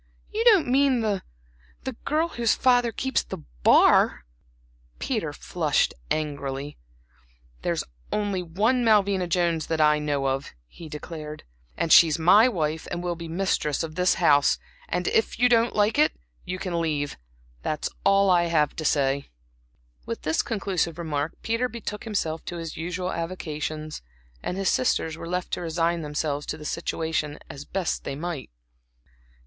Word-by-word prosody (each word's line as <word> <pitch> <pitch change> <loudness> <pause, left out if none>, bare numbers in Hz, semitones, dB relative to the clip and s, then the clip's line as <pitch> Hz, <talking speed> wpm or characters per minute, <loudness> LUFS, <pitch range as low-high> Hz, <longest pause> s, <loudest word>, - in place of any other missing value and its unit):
"You 440 +2 0
don't 415 -9 +6
mean 265 -1 +3
the 205 -3 0 0.6
the 265 - -3
girl 315 +3 +1
whose 235 -7 +1
father 245 -2 +3
keeps 265 +3 0
the - - -7 0.2
bar?" - - +5 0.7
Peter - - -2
flushed - - 0 0.2
angrily. 145 -2 -3 0.8
"There's - - -1 0.3
only 205 -3 -1
one 215 +9 +1
Malvina 200 -4 +3
Jones 170 -2 +1
that 160 -1 -1
I 150 0 +4
know 145 -2 -1
of" 135 - -2
he 160 - -12
declared, 150 0 -7 0.3
"and 165 - +3
she's 160 -2 +7
my 195 +8 +6
wife 160 -8 -2
and 175 0 -4
will 175 -1 -1
be 170 0 -7
the 165 - -6
mistress 175 -6 0
of 160 -1 -5
this 180 +2 +2
house. 145 -5 +4 0.3
And 180 +1 -1
so, - - 0
if 225 - +1
you 245 +2 +5
don't 235 -1 +3
like 210 +6 +2
it, 305 - +4 0.3
you 185 0 -3
can 180 -3 -2
leave 150 -3 -1 0.5
that's 155 -1 -2 0.2
all 195 -1 +4
I 175 -1 +4
have 155 -4 +1
to 155 - -3
say." 140 -2 +1 0.8
With 115 - -5
this 155 +1 +1
conclusive 195 -6 -2
remark 155 -2 -2
Peter 230 +2 0
betook 220 -2 -6
himself 165 -7 -2
to 175 - -5
his 165 -2 -6
usual 180 +3 -3
avocations, 155 -3 -4 0.4
and 180 - -3
his 195 -1 +1
sisters 160 -10 +1
were 165 0 -8
left 180 0 -3
to - - -1
resign 170 0 0
themselves 150 -1 -2
to - - -3
the 150 - -10
situation 160 -2 -2
as 140 +1 -9
best 190 -3 -2
they 135 - -4
might. 155 -4 -5
170 Hz, 160 wpm, -25 LUFS, 155-200 Hz, 0.8 s, she's